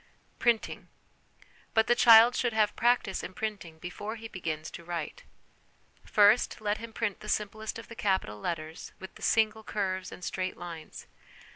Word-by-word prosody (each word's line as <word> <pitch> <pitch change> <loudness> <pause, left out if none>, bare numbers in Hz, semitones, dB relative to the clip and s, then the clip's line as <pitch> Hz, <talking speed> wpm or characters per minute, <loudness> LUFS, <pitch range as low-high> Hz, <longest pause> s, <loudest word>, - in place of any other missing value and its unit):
Printing. 235 -2 0 0.9
But 225 0 +5
the - - +4
child 235 0 +8
should 240 -2 0
have 215 -1 +2
practice 240 -5 +2
in 185 - -8
printing 200 -7 -5
before 205 +6 -6
he 225 0 -8
begins 160 -6 -5
to 170 - -9
write. 170 -2 -5 0.8
First, 210 +3 +4
let 210 -1 -1
him 230 0 -8
print 220 -3 -2
the 210 - -8
simplest 215 +1 -2
of 225 - -10
the - - -9
capital 190 - -1
letters 160 +3 -5
with 190 0 -11
single 220 0 +2
curves 190 -3 -2
and 180 - -10
straight 185 +1 -3
lines. 170 -3 -8
205 Hz, 155 wpm, -29 LUFS, 175-220 Hz, 0.9 s, child